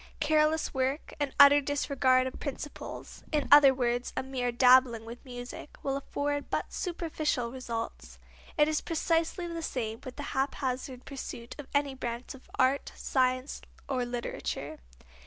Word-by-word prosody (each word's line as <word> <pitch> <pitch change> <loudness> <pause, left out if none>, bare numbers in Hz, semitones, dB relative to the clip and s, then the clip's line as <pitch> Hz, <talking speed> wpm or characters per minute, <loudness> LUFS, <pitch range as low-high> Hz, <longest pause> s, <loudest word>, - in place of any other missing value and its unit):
Careless 310 +1 +2
work, 265 +2 -1
an 290 -2 0
utter 285 +1 +9
disregard 265 -2 +2
of 260 - -5
principles, 290 +1 -7
in 300 -3 +1
other 290 -2 +9
words, 245 -1 -1
a - - 0
mere 255 -2 -2
dabbling 250 -2 +5
with 235 +2 -9
music, 245 +1 -9
will 275 -1 0
afford 285 +1 -2
but - - -2
superficial 310 -8 -2
results. 235 -3 -5 0.4
It 300 - +5
is 310 -1 0
precisely 330 +1 0
the 335 -1 -4
same 230 -6 -3
with 255 -2 -9
a - - -3
haphazard 260 -1 -2
pursuit 240 -3 -7
of 285 - -7
any 285 -1 +2
branch 240 -1 -5
of 265 - -15
art, 260 +2 +2
science, 255 +1 0 0.3
or 260 -3 0
literature. 240 0 -4
265 Hz, 145 wpm, -30 LUFS, 250-290 Hz, 0.4 s, utter